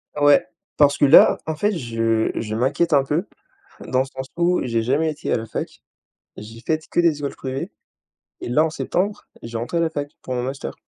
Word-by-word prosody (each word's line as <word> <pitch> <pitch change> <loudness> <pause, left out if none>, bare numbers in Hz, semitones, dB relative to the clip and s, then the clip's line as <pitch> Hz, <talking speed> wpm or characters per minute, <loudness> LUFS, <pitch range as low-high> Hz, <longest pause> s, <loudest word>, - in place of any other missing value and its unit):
Ouais. 145 -1 +5 0.3
Parce 145 -1 +4
que 145 - +4
là, 140 - +7
en 160 -1 -2
fait, 205 +6 +1
je 115 -4 0
je 110 -1 -3
m'inquiète 150 +7 +1
un 140 - +5
peu, 150 +8 -1 0.6
dans 130 - +1
le 130 - +2
sens 130 -1 -8
où 175 +1 +2
j'ai 115 -2 0
jamais 145 +7 +1
été 150 0 -4
à - - +3
la 115 - -5
fac. 110 - -6 0.6
J'ai 110 +2 -10
faite 155 +3 -2
que - - 0
des 165 -4 +3
écoles 140 -1 -4
privées. 130 0 -5 0.7
Et - - -5
là, 150 +6 +3
en 160 - -1
septembre, 200 +6 -2 0.2
je 115 - -8
vais 115 - -2
rentrer 125 +9 -2
à - - +1
la 165 - +1
fac 145 -2 -4
pour 130 - -4
mon 125 - -1
Master. 130 - -5
140 Hz, 220 wpm, -22 LUFS, 120-160 Hz, 0.7 s, là